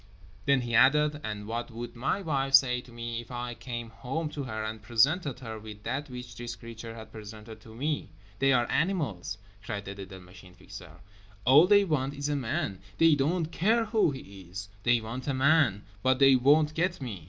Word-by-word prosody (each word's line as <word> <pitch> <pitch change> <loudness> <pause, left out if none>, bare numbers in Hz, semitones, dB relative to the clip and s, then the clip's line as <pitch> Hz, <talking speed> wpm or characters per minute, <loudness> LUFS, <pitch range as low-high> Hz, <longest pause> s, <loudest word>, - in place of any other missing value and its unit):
_" - - -27 0.4
Then 140 -2 +4
he 120 -1 -4
added: 150 +4 +4
"And 105 -1 -4
what 115 +2 -4
would 120 +1 -7
my 135 +11 -1
wife 135 -4 +2
say 125 -2 +4
to 125 - -17
me 115 0 -4
if 120 - -16
I 120 -1 -4
came 120 -1 -6
home 135 +7 -4
to 150 - -5
her 110 -3 -4
and 110 0 -5
presented 135 +6 +2
her 110 -3 -6
with 105 -1 -10
that 145 +5 -3
which 125 -1 -8
this 120 0 -6
creature 115 0 -9
had 110 -1 -10
presented 110 +1 -10
to 110 0 -13
me? 145 +5 -2 0.3
They 135 0 +4
are 120 -2 +3
animals," 135 - -1 0.3
cried 100 -1 -5
the 100 - -5
little 95 -1 -9
Machine 90 0 -15
Fixer; 90 -2 -12 0.4
"all 145 +8 +7
they 205 0 +6
want 140 -5 -1
is 140 +1 -3
a 145 - 0
man. 130 - -2 0.2
They 165 -1 +6
don't 155 +4 0
care 225 +7 +2
who 215 -4 +2
he 100 -9 -9
is; 95 +2 -7
they 120 +1 +3
want 120 +5 -6
a 140 - 0
man. 135 -7 +3 0.2
But 130 +3 +3
they 135 0 +7
won't 150 +4 +4
get 170 +2 0
me!" 120 -9 -5
125 Hz, 205 wpm, -29 LUFS, 110-145 Hz, 0.4 s, all